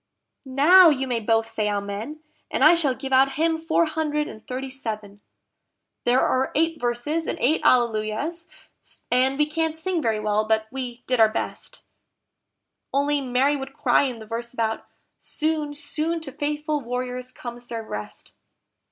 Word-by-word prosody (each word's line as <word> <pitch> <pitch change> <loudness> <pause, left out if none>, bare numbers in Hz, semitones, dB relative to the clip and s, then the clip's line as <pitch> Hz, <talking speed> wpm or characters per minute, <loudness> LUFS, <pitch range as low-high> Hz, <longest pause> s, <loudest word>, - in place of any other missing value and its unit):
Now 330 +7 +7
you 270 -3 0
may 245 -3 -1
both 225 0 +2
say 220 -2 -1
Amen, 205 +9 -4 0.3
and - - 0
I 310 +3 +8
shall 295 -7 +1
give 270 0 -5
out 270 +1 +5
hymn 320 +2 +1
four 325 +1 +2
hundred 305 -1 -1
and 220 - -10
thirty 260 +1 -4
seven." 215 -6 -6 0.8
There 245 +2 +4
are 260 +1 +1
eight 325 +1 +1
verses 245 +7 -1
and - - -2
eight 295 +6 +2
Alleluias, 240 +8 +1 0.6
and 260 +2 +3
we 300 - +3
can't 320 +1 -1
sing 340 +1 -2
very 220 -5 0
well, 215 0 +1
but 220 0 +2
we 250 -2 -6
did 255 -2 0
our 220 -1 +7
best, - - -5 1.1
Only 285 +1 +1
Mary 265 +3 +2
would 270 -1 -6
cry - - +3
in 255 -3 -3
the 220 - -10
verse 235 +2 -5
about 225 -2 -2 0.3
"Soon, 305 -1 -2
soon 315 +3 -1
to 290 -4 -6
faithful 300 +1 -2
warriors 250 +1 -4
comes 240 -1 -8
their 230 -1 -5
rest!" 105 - -7
260 Hz, 160 wpm, -24 LUFS, 230-300 Hz, 1.1 s, I